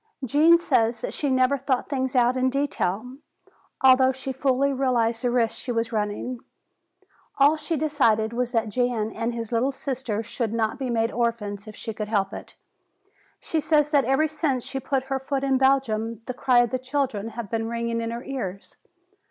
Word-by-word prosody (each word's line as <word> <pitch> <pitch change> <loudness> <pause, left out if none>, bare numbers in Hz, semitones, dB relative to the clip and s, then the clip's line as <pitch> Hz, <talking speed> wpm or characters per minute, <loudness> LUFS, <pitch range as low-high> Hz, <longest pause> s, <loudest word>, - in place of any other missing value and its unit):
"Gene 305 +6 +5
says 235 -8 +1
she 290 - -2
never 260 +1 +2
thought 260 -1 -1
things 260 -2 -2
out 245 0 +4
in 260 0 +2
detail, 250 -3 -2 0.7
although 260 0 +6
she 265 +1 -5
fully 270 +1 +1
realized 240 -3 +1
the 245 - +2
risk 240 -2 +1
she 250 - -4
was 230 0 -1
running. 215 +3 -2 1.0
All 285 +3 +5
she 315 +1 -3
decided 235 -8 +2
was 245 0 -1
that 225 -3 0
Jan 230 -1 0
and 230 +2 -3
his 230 -1 -5
little 240 +4 +1
sister 255 -5 -3
should 230 0 -3
not 225 +3 -1
be 265 -2 -2
made 230 -1 +1
orphans 225 -3 -2
if 215 - -9
she 225 - -6
could 215 0 -4
help 205 -2 0
it. - - -9 0.8
She 320 - -1
says 300 -1 +2
that 285 -3 +3
ever 270 +4 +2
since 295 -5 -1
she 270 - -5
put 265 0 -1
her 270 0 -2
foot 270 +1 -3
in 270 -1 +2
Belgium 230 -5 +1
the 255 - -4
cry 250 -1 +3
of 240 - -3
the 255 - -1
children 255 -5 -2
has 235 - -3
been 225 0 -2
ringing 235 0 -2
in 230 - -3
her 235 +2 -5
ears. 200 -8 -6
250 Hz, 185 wpm, -25 LUFS, 230-270 Hz, 1.0 s, although